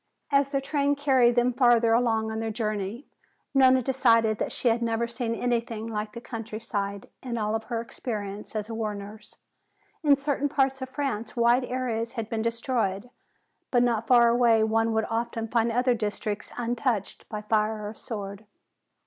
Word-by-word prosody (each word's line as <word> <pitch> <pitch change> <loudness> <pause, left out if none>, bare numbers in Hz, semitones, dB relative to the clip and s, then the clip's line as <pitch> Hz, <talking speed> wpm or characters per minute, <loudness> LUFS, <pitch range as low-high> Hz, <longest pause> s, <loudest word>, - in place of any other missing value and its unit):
As 275 0 +3
their 275 - +1
train 285 +1 +1
carried 260 -4 +3
them 245 0 +3
farther 240 -2 +4
along 225 -2 +2
on 220 - -3
their 225 0 -2
journey, 215 +2 -3 0.5
Nona 260 -1 +5
decided 230 -4 +3
that - - -2
she - - -2
had 230 +1 +1
never 230 0 0
seen 235 -1 -3
anything 235 -2 -1
like 210 -1 -4
the 235 - -6
countryside 215 -4 -5
in 245 -3 -4
all 215 0 0
her 230 +1 -3
experience 210 -4 -6
as 215 -1 -2
a 230 - -6
war 220 -2 -2
nurse. 210 +2 -10 0.7
In 290 -2 +6
certain 285 0 -1
parts 270 -2 +1
of 260 - -4
France 260 -6 -3
wide 240 +2 +3
areas 245 -2 -2
had 225 -4 -5
been 225 -1 -1
destroyed, 230 -2 -1 0.6
but 245 -1 +3
not 230 -2 0
far 240 -2 +6
away 235 -2 +4
one 225 +1 +2
would 220 0 +1
often 230 0 -2
find 230 0 +1
other 250 +2 +2
districts 210 -2 -3
untouched 240 -3 -2
by 210 -1 -5
fire 215 0 0
or 210 - -6
sword. 205 -2 -7
230 Hz, 170 wpm, -27 LUFS, 220-245 Hz, 0.7 s, In